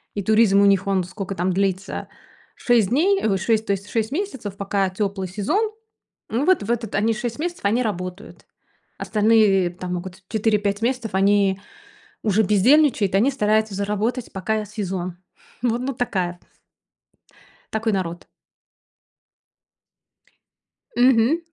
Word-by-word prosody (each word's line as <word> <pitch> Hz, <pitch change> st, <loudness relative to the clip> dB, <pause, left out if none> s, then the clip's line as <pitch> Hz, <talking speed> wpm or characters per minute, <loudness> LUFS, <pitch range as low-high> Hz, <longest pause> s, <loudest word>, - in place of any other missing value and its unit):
И 200 Hz, -, -2 dB
туризм 215 Hz, -1 st, +4 dB
у -, -, +5 dB
них 195 Hz, -1 st, +3 dB
он 195 Hz, -2 st, +1 dB
сколько 195 Hz, +2 st, -6 dB
там 180 Hz, +1 st, 0 dB
длится 195 Hz, 0 st, -2 dB, 0.5 s
6 235 Hz, -6 st, +2 dB
дней, 375 Hz, +10 st, +2 dB
ой, 200 Hz, -3 st, +2 dB
6, 220 Hz, +3 st, 0 dB
то -, -, +1 dB
есть 200 Hz, +1 st, -3 dB
6 225 Hz, 0 st, -1 dB
месяцев, 270 Hz, -, -4 dB
пока 200 Hz, -1 st, 0 dB
теплый 195 Hz, 0 st, -3 dB
сезон. 300 Hz, -, 0 dB, 0.6 s
Ну 245 Hz, +6 st, 0 dB
вот 370 Hz, -, +3 dB
в 215 Hz, -, -2 dB
это, 230 Hz, -4 st, -2 dB
они 220 Hz, +3 st, +2 dB
6 235 Hz, +1 st, -4 dB
месяцев, 345 Hz, -4 st, -4 dB
они 230 Hz, +5 st, +2 dB
работают. 185 Hz, -1 st, -6 dB, 0.5 s
Остальные 210 Hz, -4 st, +3 dB
там 180 Hz, 0 st, -5 dB
могут 185 Hz, +1 st, -8 dB
4-5 210 Hz, -2 st, 0 dB
месяцев 240 Hz, -3 st, -1 dB
они 195 Hz, 0 st, +3 dB, 0.6 s
уже 215 Hz, 0 st, +2 dB
бездельничают, 215 Hz, +1 st, +3 dB
они 230 Hz, +8 st, +3 dB
стараются 215 Hz, -3 st, +1 dB
заработать, 210 Hz, +5 st, -2 dB
пока 215 Hz, +3 st, -2 dB
сезон. 185 Hz, -4 st, -5 dB, 0.4 s
Вот, 240 Hz, -1 st, +1 dB
ну 265 Hz, +2 st, -2 dB
такая. 185 Hz, -8 st, -2 dB, 1.3 s
Такой 220 Hz, 0 st, 0 dB
народ. 175 Hz, -3 st, -3 dB, 2.7 s
Мгм. 250 Hz, +4 st, +4 dB
210 Hz, 130 wpm, -22 LUFS, 195-230 Hz, 2.7 s, у